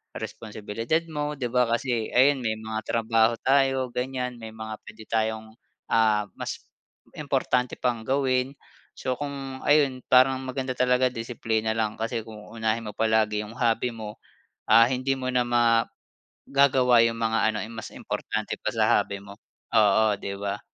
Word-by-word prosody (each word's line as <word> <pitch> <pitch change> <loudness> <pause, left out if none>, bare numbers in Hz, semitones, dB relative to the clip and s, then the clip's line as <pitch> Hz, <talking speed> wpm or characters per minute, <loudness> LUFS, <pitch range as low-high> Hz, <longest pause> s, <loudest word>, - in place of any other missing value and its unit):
responsibilidad 110 +8 -3
mo, 150 0 -3
di 125 -4 -4
ba, 125 -1 +3
kasi 115 -1 -1
ayun, 135 +2 +4
may 110 -3 -1
mga 110 0 -6
trabaho 115 0 +2
tayo 135 -2 +2
ganyan. 125 -1 -3
May 110 -1 -9
mga 110 -1 -7
puwede 110 0 -13
tayong 110 0 -1 0.4
ah, 110 -2 +3 0.2
mas - - -5 0.6
importante 130 -3 0
pang 120 -2 -1
gawin. 130 0 +1 0.4
So 130 -1 -3
kung 135 -2 -5
ayun, 145 -3 +4
parang 130 +1 +5
maganda 130 0 -3
talaga 125 0 +2
disiplina 115 -2 -2
lang, 110 -1 -2
kasi 115 0 -2
kung 110 -2 -11
unahin 110 0 -2
mo 105 - -7
palagi 110 -1 +1
yung 105 +2 -11
hobby 120 0 +1
mo 110 -2 -8 0.5
ah, 115 +2 +7
hindi 130 +2 0
mo 130 -1 -3
na 125 -1 +1
magagawa 120 +2 +1
yung 115 - -3
mga 115 -1 +1
ano, 105 - -3
eh, 110 - -8
mas 115 -2 -7
importante - - -4
pa - - -2
sa - - +4
hobby 100 0 -5
mo. 100 +1 -13 0.4
Oo, 105 0 +3
di 100 0 -5
ba? 100 0 -4
115 Hz, 155 wpm, -26 LUFS, 110-130 Hz, 0.6 s, ah